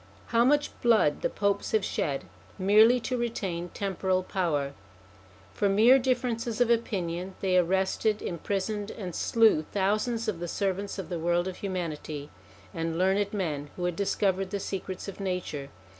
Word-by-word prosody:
How 230 0 +4
much 290 +3 +3
blood 220 -11 +3
the - - +1
Popes 200 -1 -1
have 215 -3 +3
shed 140 -2 -1 0.3
merely 215 +5 +6
to 250 +2 -2
retain 190 -7 -3
temporal 190 -1 -1
power! 150 -8 -1 0.8
For 200 - +1
mere 225 +7 +6
differences 245 -2 -1
of 245 -1 +3
opinion 185 -5 -1
they 185 -2 +1
arrested, 190 +4 +2
imprisoned 200 +4 -3
and 185 -5 -6
slew 225 -6 +4
thousands 215 +4 0
of 200 -6 -2
the 175 - -4
servants 195 +2 -2
of 195 - -6
the 175 -2 -3
world 175 +2 +1
of 185 - -5
humanity 160 -6 -4 0.4
and 165 0 -2
learned 195 +3 +2
men 150 -8 -3
who 180 - -5
had 175 -1 -1
discovered 195 0 0
the 200 - -3
secrets 190 -1 -5
of 200 - -7
nature. 180 -7 -3
195 Hz, 155 wpm, -28 LUFS, 175-215 Hz, 0.8 s, merely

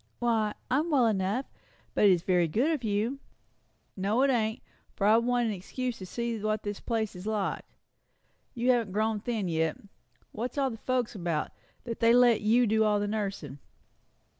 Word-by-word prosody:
"Why, 225 -3 0 0.2
I'm 300 +6 +1
well 275 -6 +4
enough. 210 +4 0 0.5
But - - +3
it's 180 -4 +4
very 180 -3 +2
good 240 - +1
of 300 -6 -2
you." 220 +5 -1 0.8
"No, 205 +6 +1
it 275 - +4
ain't, 220 -3 -1 0.3
for 200 - -1
I 215 +2 +6
wanted 240 0 +1
an - - -1
excuse 240 +6 -4
to 185 - -8
see 235 +2 -3
what 215 0 -1
the 205 - -2
place 220 -4 -2
is 180 +3 -8
like. 210 -3 -2 0.9
You 245 +1 +2
haven't 230 -6 0
grown 215 +1 0
thin 215 -3 -2
yet. 160 -1 0 0.5
What's 245 +6 -5
all 270 -2 +1
the 225 - -7
folks 250 0 -1
about, 170 -6 -2 0.3
that 230 -1 -5
they 230 0 +5
let 245 -3 +5
you 230 +4 +4
do 220 0 +2
all 210 -1 +2
the 205 - -1
nursing?" 195 -10 -4
220 Hz, 180 wpm, -29 LUFS, 200-240 Hz, 0.9 s, I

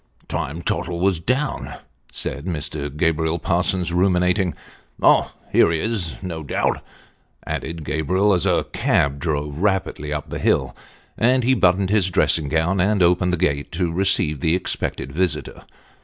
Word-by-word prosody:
" - - -26
Time 80 +5 -4
Tottle 85 +1 -2
was 95 -2 +1
down," 130 - -2 0.4
said 70 - -4
Mr. 75 -4 -3
Gabriel 80 0 +1
Parsons, 90 +1 0
ruminating 90 0 +2 0.2
" - - -36
Oh, - - +4 0.2
here - - +5
he 80 -1 0
is, 95 - -2
no 85 -3 -5
doubt," 75 - -1 0.6
added 80 -1 -4
Gabriel, 90 +8 +1
as 90 - +1
a - - +2
cab 70 0 +1
drove 75 -2 -3
rapidly 95 -6 -1
up 75 -1 -4
the - - -4
hill; - - +1 0.4
and 125 +2 +3
he 130 +3 +3
buttoned 95 -3 +2
his 100 -3 +3
dressing 80 -4 +2
gown, 80 +5 +1
and 100 0 +2
opened 90 +1 +3
the 90 - 0
gate 70 -5 -1
to 85 -1 -1
receive 85 -5 +2
the 80 +4 +2
expected 90 -5 -3
visitor. 75 -2 -2
85 Hz, 155 wpm, -21 LUFS, 80-95 Hz, 0.6 s, here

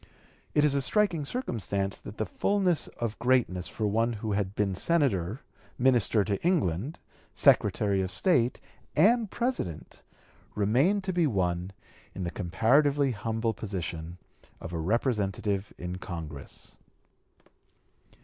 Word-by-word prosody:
It 150 - +5
is 145 - +2
a 140 - +1
striking 170 0 +1
circumstance 100 - -2
that 105 - -10
the 110 - -1
fullness 185 - +1
of 115 -2 -5
greatness 115 -7 +1
for 110 - -3
one 115 +3 +1
who 110 0 -4
had 100 -1 -1
been 100 -2 0
Senator, 115 - +1 0.4
Minister 120 -4 +3
to 100 -1 -2
England, 140 - 0 0.4
Secretary 100 -2 +3
of 95 - -2
State, 125 - +2 0.4
and 220 +7 +4
President, 235 - -3 0.5
remained 135 - +2
to 190 -1 -2
be 175 -3 +3
won 90 -5 -1 0.4
in 95 - -4
the 85 - -3
comparatively 135 - +2
humble 115 +1 -2
position 90 -5 -5 0.4
of 85 - -8
a 85 - -2
Representative 100 - -1
in 90 +1 -5
Congress. 80 -6 -8
110 Hz, 125 wpm, -28 LUFS, 95-145 Hz, 0.5 s, It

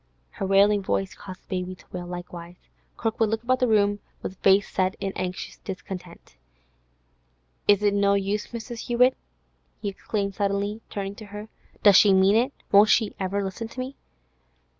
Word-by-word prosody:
Her 195 - -4
wailing 200 +1 +4
voice 190 -1 -1
caused 185 +1 -10
the - - -37
baby 185 +1 -6
to - - -20
wail 175 -1 -6
likewise. 175 -1 -8 0.4
Kirkwood 225 -1 0
looked 225 +1 -2
about 255 +1 +1
the 250 - +2
room 205 -2 +3 0.2
with 185 - -5
face 195 +1 +4
set 185 0 0
in 195 -1 -3
anxious 185 0 -4
discontent. 180 - -9 1.3
'Is 205 0 +5
it 205 -1 +3
no 200 0 +3
use, 200 +1 -1
Mrs. 235 0 -7
Hewett?' 250 +2 +4 0.6
he 205 - -2
exclaimed 200 0 -3
suddenly, 200 +2 -1
turning 195 -1 -4
to 215 - -9
her. 205 +1 -9 0.3
'Does 205 -2 +8
she 200 -2 +6
mean 190 +2 +5
it? 245 +5 +2 0.2
Won't 205 +2 +7
she 220 -1 +3
ever 195 +1 -1
listen 195 +4 -4
to 245 - -10
me? 260 +2 -4
200 Hz, 170 wpm, -25 LUFS, 190-215 Hz, 1.3 s, Does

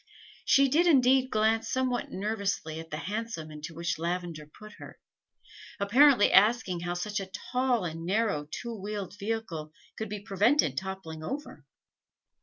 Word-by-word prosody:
She 275 0 +5
did 320 +6 +3
indeed 260 -3 +4
glance 220 0 +1
somewhat 255 -1 -1
nervously 200 -6 -2
at 160 0 -9
the 150 - -4
hansom 200 -4 -4
into 155 +2 -8
which 170 0 -2
Lavender 170 -2 -3
put 215 +8 -13
her, - - -11 0.8
apparently 245 +3 +5
asking 200 -3 +4
how 175 +1 -3
such 205 +4 -2
a 195 -1 -6 0.2
tall 250 -5 +1
and 165 -1 -5
narrow 185 -5 0
two 235 +8 -5
wheeled 205 -1 -5
vehicle 200 -8 -4 0.3
could 220 -1 -4
be 210 0 -4
prevented 200 - +2
toppling 190 -3 -5
over. 285 - -6
200 Hz, 145 wpm, -29 LUFS, 170-230 Hz, 0.8 s, She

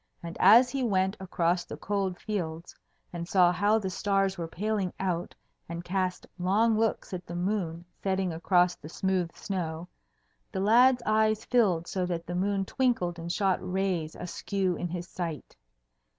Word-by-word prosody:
And 170 +1 -6
as 235 +6 +7
he 275 - -2
went 190 -4 +1
across 175 -1 0
the - - -8
cold 195 -3 -2
fields 170 -6 -4 0.4
and 170 -1 -5
saw 180 -2 +5
how 205 +5 +3
the 190 -4 -3
stars 195 0 +1
were 170 -3 -4
paling 200 +1 -2
out, 180 -3 -2 0.3
and 170 0 -5
cast 185 0 -2
long 210 +5 +3
looks 220 -2 -1
at 180 0 -4
the 175 - -6
moon 175 -2 -2 0.2
setting 190 -2 0
across 175 +2 +3
the 155 - -11
smooth 185 -1 -1
snow, 170 -3 -4 0.6
the 190 - -3
lad's 245 +5 +5
eyes 215 0 +2
filled 195 -9 +2
so 185 0 -2
that 170 -2 -3
the 175 - -5
moon 195 +2 0
twinkled 190 -9 0
and 170 +1 -4
shot 190 -1 +1
rays 180 -4 -1
askew 185 +1 -2
in 175 - -3
his 175 +1 -5
sight. 170 -6 -5
185 Hz, 165 wpm, -28 LUFS, 175-205 Hz, 0.6 s, as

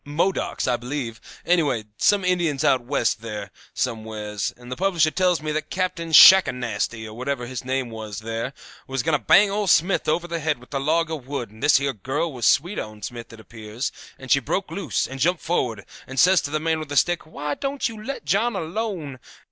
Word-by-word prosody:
Modocs, 165 +6 -1
I 125 -1 +2
believe; 120 -2 -5 0.2
anyway, 150 -10 +2
some 195 - +2
Indians 170 -6 +1
out 130 -4 +3
West 120 -3 0
there, 105 -4 -6 0.2
somewheres; 110 -3 -3
and 120 0 -12
the - - -2
publisher 170 -4 +2
tells 180 -3 +1
me 155 - -2
that 155 0 -3
Captain 180 -3 -2
Shackanasty, 125 - +6
or 110 - -9
whatever 125 +1 -3
his 125 0 -6
name 130 -1 -2
is, 110 -2 -7
there, 115 +3 -4 0.4
was 135 -2 -2
going 160 -1 +2
to 145 - -3
bang 200 +1 +5
old 205 -1 -1
Smith 180 +5 +3
over 170 +3 0
the 170 -1 -3
head 155 -1 0
with 125 +4 -16
a 135 - 0
log 160 +4 +1
of 145 -6 -6
wood, 135 -6 -4
and 110 +1 -16
this - - +5
here 140 0 -1
girl 130 - -2
she - - -10
was 120 - -2
sweet 175 +8 +2
on 110 -1 -8
Smith, 120 +1 -7
it 115 - -12
appears, 110 +2 -6 0.3
and 130 -2 -8
she 140 - +6
broke 190 +9 -3
loose, 190 -5 -1
and 135 0 -8
jumped 175 +4 +1
forward, 120 - -1 0.2
and 135 0 -4
says 185 +2 +6
to - - -4
the 155 +1 -1
man 160 0 0
with 155 -2 -7
a 145 - -1
stick, 175 0 +2
'Why 150 -1 -4
don't 275 - -2
you 220 -2 -8
let 270 - -6
John 205 +9 +1
alone? 170 - -4
145 Hz, 215 wpm, -23 LUFS, 120-170 Hz, 0.4 s, Shackanasty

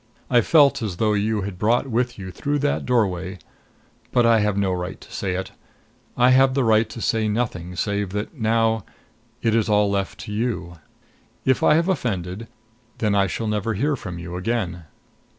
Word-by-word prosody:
I 120 -1 +6
felt 145 +1 +4
as 100 -6 -3
though 110 +1 +2
you 105 +1 0
had 95 -2 -6
brought 115 +5 +2
with 120 -1 -1
you 95 -2 -7
through 145 +9 -2
that 145 - -1
doorway 100 -6 0 0.7
But 120 -1 +3
I 115 -1 +5
have 105 -1 0
no 100 -2 +1
right 90 0 -4
to - - -14
say 95 -2 -2
it. 95 +1 -4 0.7
I 125 +1 +5
have 130 0 +5
the 135 - +2
right 110 -1 +3
to 115 - -8
say 110 -1 0
nothing 105 -6 -2
save 100 +1 -1
that 105 +1 -3
now 115 - +1 0.6
it 115 -2 +2
is 110 -1 +2
all 105 -1 +3
left 100 -1 -2
to 105 - -7
you. 105 -7 -3 0.7
If 130 -1 +2
I 150 - +5
have 165 +2 +2
offended, 105 - -2 0.5
then 105 -2 +1
I 100 -1 +3
shall 110 +5 -3
never 105 +1 -1
hear 145 +8 +1
from 95 -8 -7
you 85 +1 -6
again. 90 -4 -2
110 Hz, 185 wpm, -23 LUFS, 95-120 Hz, 0.7 s, I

